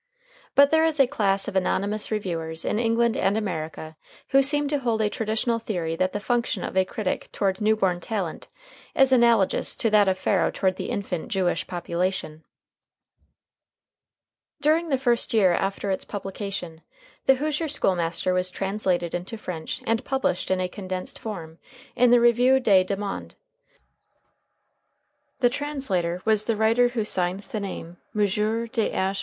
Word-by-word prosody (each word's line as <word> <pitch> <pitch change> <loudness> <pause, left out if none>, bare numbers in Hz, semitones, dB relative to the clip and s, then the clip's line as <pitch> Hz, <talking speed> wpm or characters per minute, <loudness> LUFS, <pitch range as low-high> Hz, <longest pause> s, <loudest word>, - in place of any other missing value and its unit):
But 280 0 +6
there 320 0 +4
is 320 -2 +1
a 270 - +7
class 200 -7 0
of 205 - -5
anonymous 200 +3 0
reviewers 165 -6 -2
in 210 - 0
England 230 0 +2
and 195 +2 +1
America 160 -6 -4 0.3
who 275 - +5
seem 290 +1 +3
to 290 -1 +1
hold 235 -4 0
a 210 -1 +1
traditional 225 +1 -1
theory 175 -8 -3
that 185 +2 0
the 205 - -3
function 235 -1 -1
of - - -5
a 190 0 +3
critic 190 0 -3
toward 195 0 -1
new 215 +1 +3
born 185 -4 0
talent 190 -3 -4 0.5
is 270 -1 +4
analogous 235 -6 +3
to 225 - 0
that 210 -2 +5
of 190 0 +2
Pharaoh 190 -2 +1
toward 185 -1 0
the - - -4
infant 185 -4 -3
Jewish 180 -4 -1
population. 175 -2 -3 2.2
During 320 +3 +2
the 270 - +2
first 240 -3 +1
year 190 -5 +5
after 195 +2 -1
its 190 - -1
publication 195 -4 -6 0.5
"The 270 - +7
Hoosier 305 +4 -1
School 235 -10 +1
Master" 170 +1 0
was 180 0 +1
translated 185 -3 -1
into 180 +6 -4
French 175 -6 -6
and 225 +2 0
published 265 -10 -1
in 185 0 +1
a 185 - 0
condensed 185 -1 -5
form 165 -7 -7 0.4
in 245 0 +4
the 245 0 +6
Revue 245 +3 +4
des 200 -7 +4
Deux 200 - -1
Mondes. 200 0 -6 2.1
The 245 - +5
translator 210 - -2
was 215 -1 +2
the 230 - 0
writer 225 +3 +3
who 240 -3 -2
signs 185 0 0
the 215 - -3
name 180 -3 -7 0.2
M. 210 -1 +3 0.4
Th. 205 -4 -1
205 Hz, 160 wpm, -25 LUFS, 185-235 Hz, 2.2 s, a